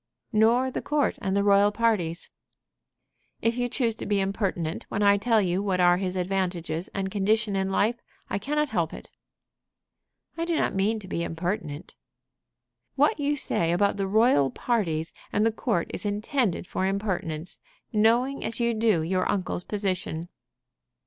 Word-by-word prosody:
"Nor 235 +4 +4
the - - -3
court 295 -1 0
and 195 -1 -1
the 200 - +2
royal 200 0 +5
parties." 205 -7 0 1.1
"If 230 +1 +1
you 245 0 0
choose 235 -2 0
to - - -5
be 205 -1 +2
impertinent 195 -4 -2
when 205 - -1
I 200 0 +6
tell 225 +2 +3
you 180 +1 0
what 195 -3 0
are 175 0 +5
his 185 0 -2
advantages 180 -3 -2
and 190 -1 -4
condition 210 +1 +1
in 190 0 0
life, 225 +5 +1 0.3
I - - -2
cannot 300 +6 0
help 170 -8 -1
it." - - -12 1.3
"I 335 - 0
do 340 -1 0
not - - +1
mean 200 +4 +1
to 190 - -10
be 170 - -2
impertinent." 170 -2 -4 1.0
"What 440 - +3
you 290 +1 +1
say 170 -11 0
about 200 +4 +2
the 195 -1 -1
royal 205 - +4
parties 165 - -1 0.2
and 210 - +2
the 225 - +3
court 215 -5 -1
is - - -2
intended 210 - 0
for 190 +2 -1
impertinence, 185 -5 -3 0.3
knowing 235 +6 +2
as 230 - -4
you 235 0 +2
do 220 0 +3
know 165 - 0
your 185 +3 0
uncle's 185 -2 -1
position." 185 -5 -3
200 Hz, 165 wpm, -26 LUFS, 180-225 Hz, 1.3 s, I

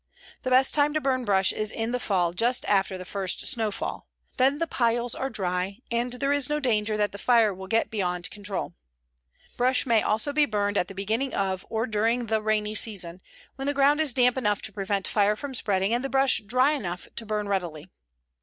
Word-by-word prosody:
The 255 - -3
best 260 +1 +4
time 295 0 +2
to - - +3
burn 260 -3 0
brush 195 -2 +2
is 215 0 -3
in 225 +1 -3
the 250 - -1
fall, 180 -7 0
just 240 +7 0
after 195 -1 +1
the 185 - -8
first 195 -1 -2
snowfall. 220 -3 -2 0.3
Then 270 +3 +3
the 330 - 0
piles 240 -4 +1
are 270 - -3
dry, 190 -2 -2
and 240 +1 0
there 275 +3 0
is 285 -2 0
no 300 0 0
danger 215 -5 0
that 210 -1 +1
the 200 - -9
fire 230 -4 +3
will 190 +1 -9
get 225 +3 +1
beyond 180 -4 -1
control. 205 -2 -5 0.8
Brush 250 +1 +3
may 230 -4 +3
also 220 +7 0
be 295 0 +3
burned 205 -1 -1
at 180 - +1
the 195 - -10
beginning 220 +7 -1
of 190 -1 -2
or 225 +1 -1
during 230 +2 0
the 220 -1 0
rainy 215 0 0
season, 185 -5 0 0.4
when 270 +1 -4
the 285 - 0
ground 285 +2 +4
is 305 -4 +3
damp 250 0 +3
enough 210 -4 0
to 215 - -6
prevent 195 -1 -2
the - - -3
fire 210 0 +3
from 275 +4 -7
spreading, 200 -3 0
and 240 +2 0
the 275 - -2
brush 270 -1 +3
dry 255 +7 +2
enough 180 - -4
to - - -2
burn 210 -1 -2
readily. 175 -5 -3
220 Hz, 215 wpm, -26 LUFS, 200-255 Hz, 0.8 s, best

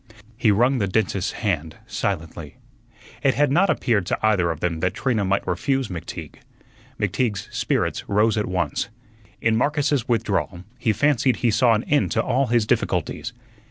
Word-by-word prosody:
He 120 -1 +2
wrung 120 +6 +3
the 100 - +1
dentist's 100 -1 0
hand 80 -8 -2
silently. 80 -5 -4 0.7
It 135 -2 +2
had 145 -1 +2
not 180 +7 +3
appeared 100 -8 +1
to - - 0
either 95 -6 +3
of 80 -2 -3
them 85 -2 -1
that 95 +3 -1
Trina 115 -5 0
might 95 +1 0
refuse 135 +9 -1
McTeague. 90 -3 -7 0.6
McTeague's 110 -7 -1
spirits - - -1
rose 105 +2 +3
at 105 -1 -1
once. 90 0 -1 0.5
In 115 -1 +2
Marcus's 145 +1 +1
withdrawal 100 -6 -1 0.2
he 115 - +2
fancied 130 +2 +2
he 120 -3 +1
saw 115 +1 +4
an 110 - -1
end 145 +1 +1
to - - +1
all 130 +2 +1
his 120 -2 +2
difficulties. 110 - -1
110 Hz, 160 wpm, -23 LUFS, 95-125 Hz, 0.7 s, saw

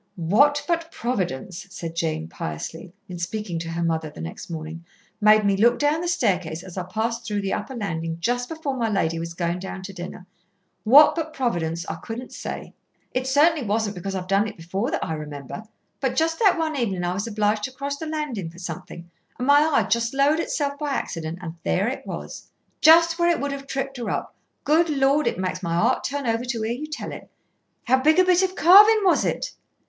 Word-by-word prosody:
"What 280 - +3
but 335 -1 -1
Providence," 185 - -3
said 170 -2 -7
Jane 160 - -2
piously, 80 - -6 0.2
in 180 -2 -7
speaking 175 -1 -3
to 165 0 -5
her 170 +1 -2
mother 160 -1 -1
the - - -13
next 80 - -7
morning, 160 0 -6 0.4
"made 215 0 +6
me 200 -1 +3
look 235 +4 +4
down 295 +2 +1
the 350 - -2
staircase 185 - 0
as 185 -2 -10
I 185 -2 -3
passed 230 +3 -2
through 205 -2 -2
the 195 -1 -2
upper 210 +6 -4
landing 165 -7 -3
just 245 +6 -1
before 315 -4 -3
my 230 -3 0
lady 165 -5 0
was 165 0 -5
going 170 +1 -1
down 190 0 -7
to 195 +1 -7
dinner. 180 0 -8 0.6
What 280 +7 +8
but 320 -2 -4
Providence 170 -9 -1
I - - -4
couldn't 240 +3 -7
say. - - -6 0.4
It 255 +1 -1
certainly 295 +3 +4
wasn't 215 -1 0
because 195 +2 -4
I've 185 -1 -3
done 195 +2 +2
it 210 - -8
before 190 +8 -3
that - - -2
I 160 - -3
remember. 150 +5 -7 0.3
But 265 -2 -1
just 325 0 +1
that 395 -5 +4
one 320 -2 -1
evening 200 -9 -1
I 175 0 0
was 200 +4 -3
obliged 210 -1 0
to 260 - -6
cross 280 +2 -4
the 320 - -6
landing 295 - -3
for 170 - -15
something, 175 -1 -7 0.3
and 250 - -3
my 285 +1 +6
eye 305 0 +3
just 235 +3 0
lowered 285 +3 +3
itself 285 -3 -2
by 295 -2 -2
accident, 165 -8 -3
and 165 -2 -5
there 195 +4 +1
it 255 - -4
was!" - - -7 0.3
"Just 330 +1 +6
where 345 0 +4
it 340 - +2
would 285 0 -2
have 275 0 -6
tripped 270 0 -3
her 240 - -4
up. - - -3 0.3
Good 325 +3 +3
Lord! 280 +1 +2
it - - 0
makes 185 0 -2
my 170 -2 -2
heart 230 +9 +2
turn 285 -1 -3
over 230 0 0
to 240 -3 -3
hear 225 +2 -1
you 295 +5 -5
tell 305 - -6
it. - - -10 0.5
How 260 +2 +3
big 310 +5 +4
a 370 - +7
bit 365 0 +4
of 375 0 0
carving 420 +5 +8
was 375 - +4
it?" - - -2
225 Hz, 215 wpm, -24 LUFS, 175-285 Hz, 0.6 s, What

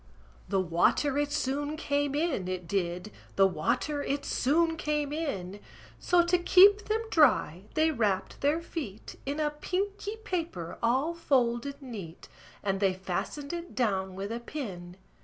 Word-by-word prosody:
The 195 0 +2
water 185 - +2
it 290 0 0
soon 290 +2 -1
came 285 -2 0
in, 295 - 0
it 185 -2 -4
did; 180 +1 -2 0.2
The 195 - +6
water 195 - 0
it 285 0 -2
soon 325 +5 +2
came 300 -2 -1
in: 205 - -3 0.4
So, 350 -1 +3
to 350 +1 +3
keep 400 +4 +6
them 440 +1 0
dry, 205 - +3
they 315 +1 +3
wrapped 210 -9 -1
their 300 +4 +1
feet 235 - -7
In 285 +2 -2
a 300 -1 +1
pinky 395 +7 -3
paper 320 - -3
all 260 +8 +2
folded 270 -4 0
neat; 200 -10 -8 0.4
And 195 -1 0
they 195 -2 +2
fastened 195 - -4
it 345 0 -6
down 190 -6 0
with 195 +3 -4
a 230 - -3
pin. 190 -10 -7
275 Hz, 150 wpm, -29 LUFS, 195-315 Hz, 0.4 s, The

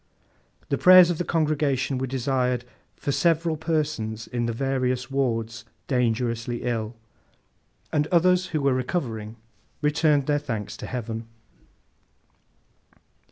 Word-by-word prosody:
The - - 0
prayers 180 -1 +8
of 165 - -3
the - - +1
congregation 145 -6 0
were 130 - -2
desired 125 -1 -1 0.3
'for 140 - -3
several 165 +1 +2
persons 150 -9 -2
in 120 -1 -2
the - - 0
various 130 0 -1
wards 115 -4 -1 0.2
dangerously 120 -1 -1
ill;' 115 -2 -2 1.0
and 150 0 +2
others 180 +2 +3
who 155 -4 -2
were 140 -1 +3
recovering 120 -5 -3 0.5
returned 150 -1 +3
their 145 0 +1
thanks 115 -8 -5
to - - -7
Heaven. 115 -2 -5
130 Hz, 115 wpm, -25 LUFS, 120-155 Hz, 1.0 s, prayers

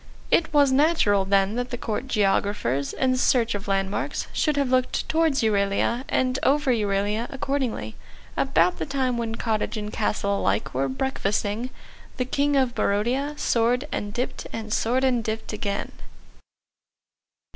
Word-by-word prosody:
It 325 0 +3
was 285 -3 +4
natural 260 - +3
then 195 +1 +2
that 245 0 -2
the 245 - -4
Court 230 +3 -3
Geographers, 200 - 0
in 260 -1 +1
search 235 -2 +2
of 205 0 -5
landmarks, 195 0 -1
should 300 -2 +1
have 275 -3 +1
looked 255 -1 +1
towards 320 -5 +2
Euralia; 210 +4 +1
and 255 0 +1
over 280 0 +2
Euralia 210 0 0
accordingly, 260 - -2 0.4
about 175 +2 +2
the - - -3
time 265 -3 0
when 225 -1 -2
cottage 225 -1 -1
and 210 0 -5
castle 200 -2 0
alike 100 +2 0
were 135 +1 0
breakfasting, 210 - -1 0.5
the 250 - 0
King 285 +3 +1
of 260 -3 +2
Barodia 255 +10 0
soared 245 +4 +1
and 205 - -3
dipped 245 +4 -4
and 220 -1 -4
soared 250 +4 +1
and 250 -3 +2
dipped 220 0 -4
again. 200 -1 -3
230 Hz, 145 wpm, -24 LUFS, 205-260 Hz, 0.5 s, was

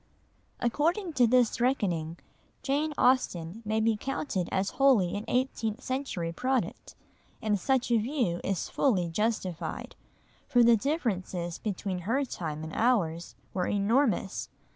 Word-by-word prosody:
According 330 - 0
to 250 -5 +4
this 245 -1 +3
reckoning, 175 -11 0 0.5
Jane 290 +3 0
Austen 215 -7 +1
may 215 +1 0
be 220 0 +2
counted 210 - -3
as 190 +1 0
wholly 210 -10 +4
an 205 +2 -4
eighteenth 245 -3 -1
century 255 -11 -2
product, 255 +7 -2 0.4
and 210 -2 0
such 260 +2 +1
a 235 - +5
view 230 - -1
is 195 -3 -1
fully 185 -11 +1
justified, 190 -2 -2 0.5
for 245 -1 +4
the 235 0 +7
differences 195 - -2
between 195 -3 -3
her 235 +10 0
time 155 - -5
and 160 - -7
ours 175 -9 +1 0.2
were 180 -2 -1
enormous. 210 0 +1
220 Hz, 130 wpm, -29 LUFS, 180-255 Hz, 0.5 s, the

